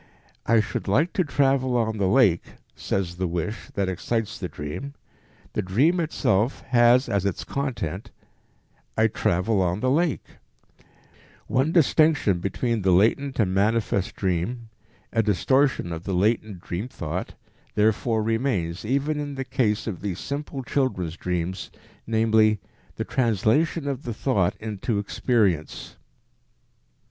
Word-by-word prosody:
"I 115 -1 +5
should - - -4
like 140 - +2
to 185 - +2
travel 135 -4 +2
on 110 -2 -1
the 95 - +2
lake," 95 -5 +3 0.2
says 90 -3 -2
the 90 0 -1
wish 85 +6 -4
that 100 -2 0
excites 100 +5 -2
the - - -3
dream; 75 - -6 0.6
the - - 0
dream 135 - +2
itself 125 - 0
has 120 +1 +5
as 100 -2 0
its 100 -3 -2
content 120 - -4 0.9
"I 110 - +4
travel 105 -1 +1
on 90 +1 0
the 130 +3 +1
lake." 160 +1 +1 1.2
One 135 +5 +1
distinction 155 - +3
between 110 +5 -1
the 95 - +1
latent 115 +10 +2
and 95 -4 +2
manifest 105 -1 +1
dream, 100 +6 -2 0.4
a 115 - +3
distortion 110 - +1
of 80 +1 -6
the 95 - -1
latent 105 -1 0
dream 90 +8 -4
thought, 85 - -5 0.4
therefore 110 +1 +2
remains 110 -7 -1
even 140 +6 0
in 145 -1 -4
the 135 0 -4
case 110 -4 0
of 100 -6 -5
these 100 -4 -3
simple 140 -1 -5
children's 125 - -1
dreams, 90 +1 -3 0.4
namely, 110 -1 +3 0.4
the - - -3
translation 130 - +1
of 135 -3 -2
the 120 -3 -5
thought 100 -8 +1
into 110 0 -3
experience. 100 - 0
110 Hz, 135 wpm, -25 LUFS, 95-130 Hz, 1.2 s, I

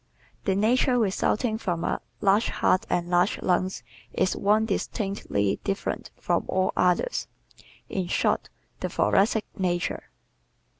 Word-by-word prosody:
The 190 - +2
nature 245 +5 +3
resulting 220 +1 +1
from 175 -5 -2
a - - -1 0.2
large 205 +3 +3
heart 185 - +1
and 175 -1 0
large 175 +2 +2
lungs 185 +1 0 0.3
is 185 - +1
one 210 +2 +3
distinctly 195 - -1
different 195 0 -3
from - - 0
all 185 0 +1
others 180 - +1 0.6
in 185 -2 -2
short, - - 0 0.3
the - - -2
Thoracic 215 +2 +2
nature. 175 -2 -1
195 Hz, 120 wpm, -26 LUFS, 180-215 Hz, 0.6 s, nature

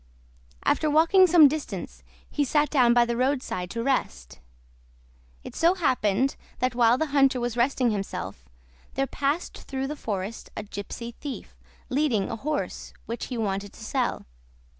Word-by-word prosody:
After 310 - +2
walking 330 +5 +5
some 330 -3 +8
distance 300 +1 -5 0.3
he 295 - 0
sat 295 +2 +1
down 250 -5 +5
by 240 0 +5
the 235 0 -2
roadside 255 -8 -1
to 230 +5 -3
rest. 65 - -2 1.0
It - - -9
so 340 +3 +3
happened 255 - +1 0.2
that 255 0 0
while 240 0 +4
the 315 - +1
hunter 270 -2 +4
was 240 -1 -2
resting 245 0 +2
himself, 100 - -4 0.5
there 270 - +1
passed 285 +5 -2
through 265 0 -4
the 295 +3 -4
forest 205 -4 -5
a 215 - -3
gypsy 210 +4 -7
thief, 280 +2 -8 0.3
leading 255 -7 +1
a - - -2
horse 295 +6 -4
which 230 +1 -4
he 250 - -4
wanted 200 -2 -2
to - - -12
sell. - - -1
255 Hz, 155 wpm, -26 LUFS, 225-290 Hz, 1.0 s, some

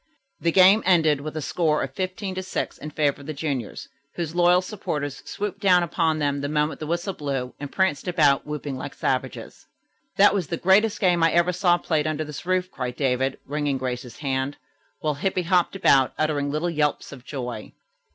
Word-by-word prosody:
The 170 - +1
game 190 +4 +6
ended 160 -6 +3
with 155 +1 -6
the 155 - -3
score 155 -2 +1
15 185 +6 -4
to 185 - -3
6 185 - -4
in 150 - -6
favor 145 -2 0
of 140 - -12
the 155 - -4
juniors, 140 -6 -4 0.3
whose 165 -2 -3
loyal 175 +1 +4
supporters 150 -8 -4
swooped 205 -1 -4
down 185 -3 +4
upon 165 -1 0
them 145 -2 -1
the 145 - -3
moment 150 +1 0
the 155 - -5
whistle 170 +4 -2
blew 135 -5 -4
and 145 -1 -6
pranced 190 -4 0
about, 150 -6 +3
whooping 150 -2 -5
like 130 - -7
savages. - - -3 0.5
"That 200 0 +6
was 190 -6 -1
the 170 - -3
greatest 205 +5 +3
game 180 -4 +3
I 165 0 +4
ever 170 +1 +3
saw 175 -1 +3
played 155 -3 -1
under 155 0 -1
this 150 +3 -8
roof," 185 0 0
cried 125 -2 -4
David, 130 -1 0
wringing 145 -1 -1
Grace's 125 -2 -5
hand, 135 -1 -2 0.4
while 155 -1 0
Hippy 180 +5 -1
hopped 180 +2 +2
about, 135 -9 +4
uttering 150 -2 0
little 155 +4 -1
yelps 150 -2 -1
of 135 -4 -11
joy. 125 -5 -6
155 Hz, 190 wpm, -24 LUFS, 140-180 Hz, 0.5 s, game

